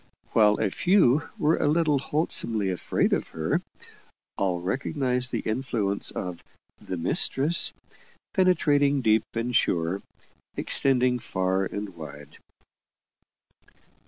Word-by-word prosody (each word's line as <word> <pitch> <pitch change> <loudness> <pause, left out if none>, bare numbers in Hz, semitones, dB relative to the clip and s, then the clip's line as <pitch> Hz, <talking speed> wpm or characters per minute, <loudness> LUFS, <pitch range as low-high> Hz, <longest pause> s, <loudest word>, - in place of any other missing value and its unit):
While 105 -2 +4
a 105 -3 0
few 160 - +3
were 160 -4 +2
a - - +1
little 150 -2 +2
wholesomely 115 - 0
afraid 90 - 0
of - - -1
her 80 0 -1 0.7
all 90 -3 -1
recognized 125 - -1
the - - -2
influence 110 -4 -1
of 90 -2 -5 0.4
"the 95 - -5
mistress," 140 - +2 0.6
penetrating 145 -7 +3
deep 110 -2 +3
and 115 +1 -2
sure, 85 -1 +1 0.6
extending 125 -2 +2
far 95 -2 -1
and 100 -1 -6
wide. 75 -3 -11
115 Hz, 105 wpm, -26 LUFS, 95-145 Hz, 0.7 s, While